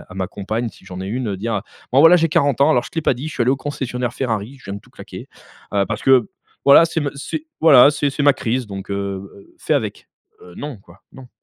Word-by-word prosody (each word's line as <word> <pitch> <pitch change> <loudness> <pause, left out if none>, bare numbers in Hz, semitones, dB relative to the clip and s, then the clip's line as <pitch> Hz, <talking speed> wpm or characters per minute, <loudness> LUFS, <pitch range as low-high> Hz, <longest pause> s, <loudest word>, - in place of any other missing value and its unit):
à - - -10
ma 95 -1 -2
compagne, 110 +5 -4
si 95 - -17
j'en 95 -1 -8
ai 95 - -5
une, 110 -2 -3
dire, 115 +4 -3
heu: 105 - -1 0.3
«Bon, 135 - +5
voilà, 165 +3 +8
j'ai 165 -1 +2
40 145 -4 +1
ans, 140 +3 +5
alors, 125 -6 +3
je - - -10
t'ai 160 - -3
pas 135 - +2
dit, 140 +6 -6
je - - -8
suis - - 0
allé 120 - +2
au 135 - +2
concessionnaire 125 -3 -4
Ferrari, 120 0 -3
je - - -20
viens 100 - -6
de 100 - -8
tout - - -23
claquer, - - -11 0.4
heu, 100 -1 +2
parce 110 0 -4
que, 130 -5 +4 0.4
voilà, 140 +4 +8
c'est 165 0 -2
me 145 -1 -2
c'est, 305 - -6
voilà, 145 -4 +7
c'est 145 0 -1
c'est 145 - -3
ma 145 - +7
crise 125 0 -2
donc, 100 -1 -8
heu - - -1 0.4
heu, 100 - -18
fais - - 0
avec». - - -3 0.3
Heu, 90 -1 -14
non, 145 -3 -6
quoi, 90 -1 -20
non. 130 -2 -13
125 Hz, 270 wpm, -20 LUFS, 105-145 Hz, 0.4 s, voilà